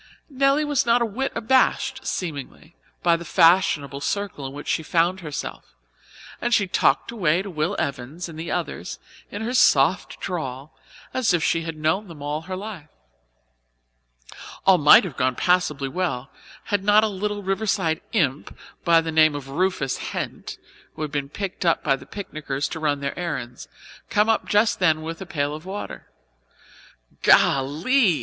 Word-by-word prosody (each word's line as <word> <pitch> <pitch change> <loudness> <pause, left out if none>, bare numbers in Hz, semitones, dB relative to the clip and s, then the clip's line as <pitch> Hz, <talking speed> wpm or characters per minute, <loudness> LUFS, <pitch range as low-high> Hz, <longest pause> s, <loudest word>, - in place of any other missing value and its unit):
Nelly 275 +2 +2
was 290 -3 +1
not 235 0 +3
a - - +1
whit 255 +5 -3
abashed, 265 +2 +1
seemingly, 160 -1 -5 0.3
by 170 -1 +4
the 170 - -5
fashionable 165 -5 +3
circle 195 -5 -3
in - - -8
which 145 +1 -9
she - - 0
found 170 +3 +1
herself, 150 - -7 0.7
and 240 0 +2
she 205 - +2
talked 145 -4 +1
away 180 -5 +1
to 195 - -7
Will 160 +4 -1
Evans 140 +6 -4
and 160 -2 -10
the 165 +1 -5
others - - -4 0.3
in 205 +2 -5
her 240 +3 -2
soft 165 - +3
drawl 140 -6 -5 0.4
as 225 -8 +2
if 165 - -1
she 165 - +1
had 165 -1 -6
known 160 +7 0
them 165 -4 -11
all 150 +1 -2
her 185 +3 -6
life. 190 -5 -7 1.8
All 190 -1 +6
might 150 0 +8
have 175 -9 -6
gone 130 0 +1
passably 150 -6 +1
well, 135 -5 -3 0.3
had 205 -2 -1
not 210 +1 +5
a - - +3
little 205 0 -3
Riverside 195 -4 0
imp, 150 - -1 0.3
by 165 -1 +5
name 155 -2 +3
of 140 -2 -7
Rufus 160 -3 0
Hent, - - -5 0.4
who 155 - -4
had 150 - -4
been 140 -2 -3
picked 195 +4 -5
up 165 -2 +2
by 140 -3 +3
the 135 - -13
picnickers 150 -8 -4
to 160 - -5
run 145 -2 0
their 140 +5 -4
errands, 130 -9 -5 0.4
come 210 +2 +2
up 225 - +1
just 210 +2 +3
then 160 -4 +2
with 165 +2 -6
a 190 - -7
pail 145 -3 -1
of 155 +1 -8
water. 195 +3 -7 1.1
"Golly!" 160 - +3
170 Hz, 165 wpm, -23 LUFS, 145-200 Hz, 1.8 s, might